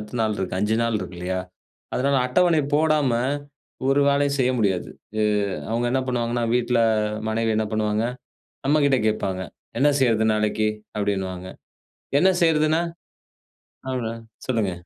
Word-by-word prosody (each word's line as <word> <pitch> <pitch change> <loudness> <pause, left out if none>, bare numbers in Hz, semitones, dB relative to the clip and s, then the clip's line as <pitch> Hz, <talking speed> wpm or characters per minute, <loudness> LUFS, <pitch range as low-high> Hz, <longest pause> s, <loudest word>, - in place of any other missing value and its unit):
அடுத்த 105 +3 -6
நாள் 110 -1 0
இருக்கு, 95 -2 -3
5 110 +2 +1
நாள் 115 -2 +1
இருக்கு 90 -2 -7
இல்லையா? 95 +1 -2 0.5
அதனால 140 +2 +2
அட்டவணை 165 +4 +3
போடாம 155 -3 +3 0.8
ஒரு 140 +1 +4
வேலையும் 140 0 +2
செய்ய 130 0 +3
முடியாது. 95 -5 0 0.3
அ - - +3 0.5
அவுங்க 120 +2 0
என்ன 130 0 +1
பண்ணுவாங்கன்னா, 120 -1 0
வீட்டுல 120 -1 +2 0.5
மனைவி 115 0 0
என்ன 110 0 +1
பண்ணுவாங்க, 110 0 0 0.6
நம்மகிட்ட 140 -2 +3
கேட்பாங்க, 95 -3 -2 0.4
"என்ன 145 - +5
செய்றது 115 -3 +3
நாளைக்கு?" 105 0 +1 0.3
அப்படின்னுவாங்க. 95 -3 -2 0.7
"என்ன 190 +3 +5
செய்றதுன்னா?" 160 0 +3 1.1
அப்படீனா 120 -3 -2 0.3
சொல்லுங்க. 110 -6 +1
115 Hz, 130 wpm, -23 LUFS, 105-140 Hz, 1.1 s, என்ன